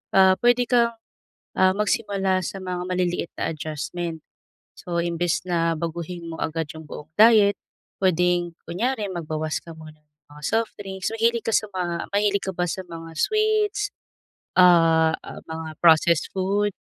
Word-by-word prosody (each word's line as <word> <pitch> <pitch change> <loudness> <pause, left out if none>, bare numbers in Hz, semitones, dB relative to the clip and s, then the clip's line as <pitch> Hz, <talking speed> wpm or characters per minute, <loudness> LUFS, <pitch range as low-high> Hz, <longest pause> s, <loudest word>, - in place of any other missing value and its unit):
Ah, 190 -1 +7
pwede 245 0 +4
kang, 235 -2 +3 0.6
ah, 185 0 +5
magsimula 195 -2 0
sa - - -5
mga 180 -1 -3
maliliit 180 -2 -1
na - - -1
adjustment. 160 +2 -5 0.6
So 170 -1 -4
imbes 170 0 -1
na 165 -1 +1
baguhin 170 +1 -5
mo 165 - -6
agad 160 -1 -2
yung 160 - -9
buong 150 +1 -9
diet, 215 -2 +6 0.5
pwedeng 175 -1 +2
kunyari 220 +3 -1
magbawas 155 -2 -3
ka 170 - -10
muna 155 -1 -12
ng 150 0 -46
mga 150 0 -14
softdrinks. 200 -4 -2
Mahilig 230 +1 +1
ka 225 - 0
sa - - +2
mga 175 -3 -3
mahilig 200 -1 +2
ka 190 - -3
ba 175 - 0
sa 190 - -3
mga 165 -1 -9
sweets, 430 -1 +1 0.7
ah, 165 -3 +6
ah, - - -9
mga 160 -1 -6
processed 165 -1 +4
food? 200 +2 0
180 Hz, 150 wpm, -24 LUFS, 165-205 Hz, 0.7 s, Ah